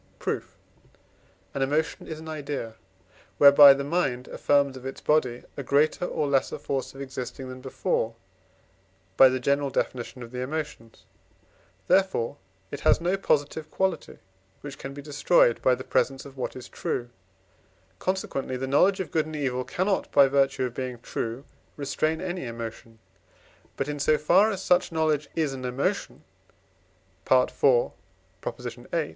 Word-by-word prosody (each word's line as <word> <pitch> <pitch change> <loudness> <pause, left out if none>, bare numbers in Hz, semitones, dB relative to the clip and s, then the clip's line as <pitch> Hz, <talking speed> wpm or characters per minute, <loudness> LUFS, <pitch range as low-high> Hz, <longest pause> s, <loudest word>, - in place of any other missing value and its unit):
Proof. - - -4 1.0
An 140 - -3
emotion 150 +4 -1
is 155 -1 -6
an 160 - -10
idea, 145 -7 -5 0.6
whereby 140 -1 +9
the 140 - -3
mind 140 -5 -1
affirms 140 -2 +2
of 130 - -10
its 135 0 -6
body 130 -5 +1
a - - -4
greater 145 +6 +2
or 150 -4 -1
less 140 -1 +2
force 135 -1 -4
of 135 - -8
existing 130 -1 -6
than 130 0 -9
before 115 -3 -1 1.0
(by 135 - +8
the 130 0 -1
general 140 +2 +1
Definition 125 -1 -3
of 115 - -11
the 125 - -5
Emotions); 140 -4 -6 0.8
therefore 185 -9 +2 0.3
it 145 - -5
has - - +4
no 175 +3 +1
positive 155 -4 0
quality, 190 -1 -2 0.4
which 145 -2 -9
can 135 0 -7
be 145 - -8
destroyed 145 -3 +3
by 130 - +4
the - - -8
presence 135 0 0
of 140 -1 -12
what 130 - -4
is 130 - -9
true; 120 0 -3 0.9
consequently 160 -8 -2
the 130 - -3
knowledge 180 +9 +3
of 185 - -4
good 155 -1 +1
and 155 - -7
evil 130 -4 -1
cannot, 190 +8 -1
by 140 -1 +6
virtue 135 -1 +2
of 125 -2 -2
being 125 -1 -4
true, 120 +3 -5 0.3
restrain 155 +3 -1
any 180 -7 -4
emotion. 115 -1 -8 0.8
But, 135 - -1
in 145 0 -4
so 150 +2 +3
far 185 +8 +4
as 195 -3 -4
such 180 - +2
knowledge 155 -3 0
is 155 -4 0
an 130 -1 -7
emotion 125 +2 -2 1.1
(IV. 130 -1 +5 0.6
viii.) 95 +6 -8
140 Hz, 150 wpm, -26 LUFS, 130-155 Hz, 1.1 s, whereby